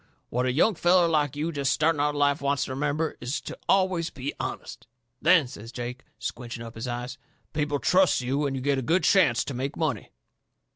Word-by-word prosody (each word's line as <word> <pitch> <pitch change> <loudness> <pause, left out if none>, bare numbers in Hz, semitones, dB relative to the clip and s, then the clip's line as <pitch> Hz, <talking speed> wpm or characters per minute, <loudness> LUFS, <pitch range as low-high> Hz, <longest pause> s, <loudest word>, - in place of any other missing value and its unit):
What 125 +2 0
a - - +2
young 165 - +3
feller 175 0 +4
like 150 -4 +1
you 155 +3 -2
jest 140 -3 0
starting 155 0 +2
out 145 - +3
into 145 - -4
life 145 +1 +2
wants 140 0 +1
to - - -7
remember 150 +4 -1
is 125 +4 -2
to - - -7
always 185 -3 +2
be 135 +2 -5
honest. - - -6 0.3
Then," 165 -4 +5
says 115 -2 -10
Jake, 125 +1 -6
squinching 120 0 -6
up 115 - -9
his 115 +3 -6
eyes, 120 +1 -5 0.3
"people 145 -1 0
trusts 185 +5 +3
you 135 +4 0
and 135 - -3
you 130 - -4
get 140 -1 +1
a - - -2
good 165 +9 +1
chancet 145 -12 +4
to - - -4
make 130 +3 -4
money. - - -2
145 Hz, 210 wpm, -26 LUFS, 125-160 Hz, 0.3 s, Then